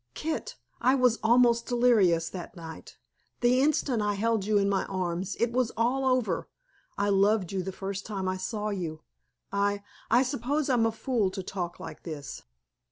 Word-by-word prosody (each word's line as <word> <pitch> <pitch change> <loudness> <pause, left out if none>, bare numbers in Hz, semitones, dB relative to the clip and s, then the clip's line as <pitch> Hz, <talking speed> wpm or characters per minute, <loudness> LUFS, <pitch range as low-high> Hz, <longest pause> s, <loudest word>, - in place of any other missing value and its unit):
Kit, 320 +10 -3 0.3
I 255 +2 +4
was 250 -3 +3
almost 235 0 +4
delirious 215 -9 +3
that 185 +3 -8
night. 165 -2 -10 0.4
The 245 +1 +4
instant 275 -5 +2
I 205 0 0
held 220 -1 0
you 210 0 +2
in 200 -1 +3
my 200 -1 +1
arms 185 0 -2
It 235 0 +2
was 250 -1 +1
all 250 +4 +1
over. 255 -3 0 0.5
I 200 0 +1
loved 200 -1 +3
you 190 -1 -1
the 190 +1 -4
first 195 +1 -5
time 195 -3 -4
I 185 0 -1
saw 210 +3 -3
you. 165 -6 -4 0.5
I 200 0 0 0.3
I 240 +3 +5
suppose 275 +2 -1
I'm 230 -3 +3
a - - 0
fool 225 -3 0
to 190 0 -6
talk 180 -2 -4
like - - -8
this." 150 -4 -7
210 Hz, 175 wpm, -28 LUFS, 190-245 Hz, 0.5 s, I